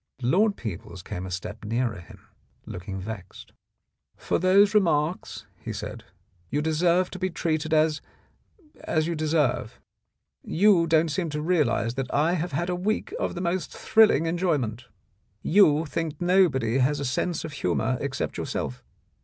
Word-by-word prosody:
Lord 200 - +3
Peebles 95 -4 -7
came 95 -2 -5
a - - -7
step 95 +5 -6
nearer 115 -1 -1
him, 85 - -15 0.4
looking 95 +2 -6
vexed. 95 -2 -9 0.6
"For - - -1
those 195 +3 +5
remarks," 170 -4 +1 0.2
he - - -4
said, - - -7 0.4
"you 145 - 0
deserve 170 +4 +2
to 185 - -7
be 185 +1 0
treated 160 -2 -2
as 155 0 +2 0.4
— 315 -6 -29
as 155 -1 +1
you 170 - -1
deserve. 150 -8 0 0.6
You 180 -2 +3
don't 160 0 +3
seem 170 +2 -2
to 150 0 -3
realize 150 - +1
that 130 0 -4
I 155 +4 +2
have 175 0 -2
had 170 +5 -1
a - - 0
week 215 - -2
of - - -2
the 175 - -4
most 180 0 -2
thrilling 220 -7 +4
enjoyment. 150 - -1 0.6
You 160 -5 +4
think 160 -1 -3
that 175 - -4
nobody 135 -10 +3
has 140 +3 +2
a 140 - -3
sense 160 +7 -1
of 155 - -7
humour 110 +2 -1
except 140 -1 -3
yourself. 65 - -4
155 Hz, 160 wpm, -26 LUFS, 125-180 Hz, 0.6 s, those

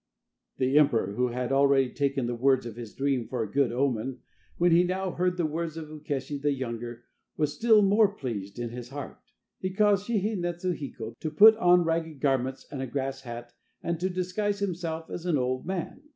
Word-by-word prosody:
The 130 +3 +4
emperor, 115 -9 +2
who 125 +3 +1
had 125 +1 -3
already 135 -2 +4
taken 140 -2 0
the 120 - -2
words 130 +1 +2
of 115 -2 -6
his 115 -3 -9
dream 135 -4 0
for 125 -3 -2
a 105 - -7
good 135 -2 +2
omen, 125 -1 -1 0.4
when 175 0 +3
he 170 +2 +6
now 185 +1 -1
heard 180 +1 0
the 175 - +1
words 160 +1 -3
of 155 -2 -7
Ukeshi 145 -2 -4
the 145 0 +2
younger, 120 -2 -5 0.3
was 150 -2 0
still 220 +5 +5
more 205 +2 +5
pleased 115 - -6
in 120 -1 -3
his 120 0 -7
heart. 140 0 -7 0.4
He 185 - -2
caused 205 0 +2
Shihi 220 -1 0
netsu 175 +1 -2
hiko 115 -6 -7
to 155 - -3
put 215 +8 +8
on 180 -3 +5
ragged 165 -2 -2
garments 130 -1 0
and 135 - -4
a 135 - -3
grass 135 +1 -3
hat 120 -1 -8 0.3
and 170 -1 -2
to 185 +2 0
disguise 185 +3 -1
himself 170 -5 -3
as 175 +1 -5
an 165 -4 +2
old 130 +3 -1
man. 190 - -4
145 Hz, 200 wpm, -28 LUFS, 125-175 Hz, 0.4 s, put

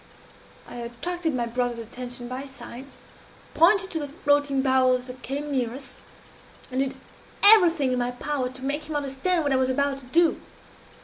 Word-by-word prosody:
I - - -9
attracted 310 +7 -3
my 240 -1 0
brother's 240 0 -2
attention 245 +2 -8
by 255 +2 -5
signs, 265 0 -11 0.6
pointed 380 +3 +4
to 325 - -2
the 290 - -4
floating 285 -3 +1
barrels 255 -1 +3
that 255 0 -10
came 285 +3 -4
near 250 -3 -1
us, 270 -2 -9 0.7
and 255 - -2
did 270 -1 -2 0.5
everything 345 -10 +7
in 250 - 0
my 245 0 0
power 255 +1 -3
to 260 +1 -9
make 290 +3 -2
him 310 - -4
understand 290 +5 -1
what 285 - 0
I - - +3
was 260 0 +1
about 275 +1 0
to 265 - -13
do. 330 +6 +2
270 Hz, 175 wpm, -25 LUFS, 250-295 Hz, 0.7 s, everything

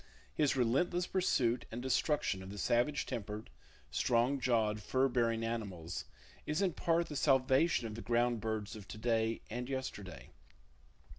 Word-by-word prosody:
His 150 -3 +2
relentless 140 +9 +2
pursuit 125 -11 +1
and 115 - -4
destruction 130 -4 +1
of 95 - -8
the 100 - -7
savage 120 +9 +1
tempered, 105 - -5 0.4
strong 120 - +2
jawed 110 -4 +1
fur 130 +4 +2
bearing 115 -3 +1
animals 100 -8 -4 0.4
is 150 +1 0
in 190 -4 +2
part 170 +1 +1
the 150 - -6
salvation 135 +1 +3
of 110 - -4
the 115 - -6
ground 120 -1 +1
birds 110 -1 -3
of 105 -2 -10
to - - -8
day 115 0 0
and 125 +3 -4
yesterday. 130 -8 -5
120 Hz, 150 wpm, -34 LUFS, 110-135 Hz, 0.4 s, salvation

